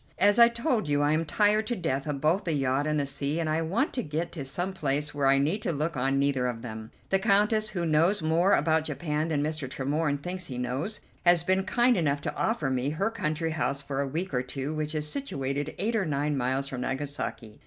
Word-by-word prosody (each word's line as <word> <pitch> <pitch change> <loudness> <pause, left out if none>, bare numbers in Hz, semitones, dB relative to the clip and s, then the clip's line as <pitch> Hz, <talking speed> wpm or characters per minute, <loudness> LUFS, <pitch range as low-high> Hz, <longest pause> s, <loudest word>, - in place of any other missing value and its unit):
As 205 +3 +4
I 235 - +10
told 235 - -1
you, 145 0 +2
I 145 - +3
am 160 +2 +1
tired 210 +6 +2
to 240 - -1
death 155 - -2
of 145 -2 -2
both 165 +8 +2
the 165 - 0
yacht 135 +1 +1
and 150 0 +1
the 140 - 0
sea, 140 +3 -2
and 165 - -1
I 155 +1 +1
want 195 - 0
to 255 - -1
get 160 -1 -3
to 150 - -5
some 175 +8 -3
place 150 -3 -1
where 145 -2 +1
I 135 0 +5
need 160 +10 0
look 155 +1 -1
on 135 +2 +1
neither 135 -2 +1
of 115 -2 -4
them. 110 -2 -7 0.2
The 195 - +3
Countess, 210 +1 +3
who 175 -5 -2
knows 165 +6 +3
more 165 +4 +2
about 160 +1 +3
Japan 155 0 -2
than 150 -3 0
Mr. 155 -3 -2
Tremorne 145 +3 -1
thinks 180 +3 -4
he 130 - -6
knows, 130 - -3 0.2
has 175 -1 +5
been 190 +2 +1
kind 240 +3 +3
enough 145 -4 +1
to - - -3
offer 165 - 0
me 130 +1 0
her 195 +9 -1
country 165 -6 -2
house 145 -2 -1
for 140 0 -2
a 140 - -1
week 165 +5 -3
or 125 - +1
two, 135 +3 -4
which 155 0 -3
is 150 0 0
situated 145 - -3
eight 220 +5 -1
or 210 -4 +1
nine 145 0 0
miles 135 +1 -1
from 130 -3 -5
Nagasaki. 135 -5 -4
155 Hz, 235 wpm, -28 LUFS, 140-185 Hz, 0.2 s, I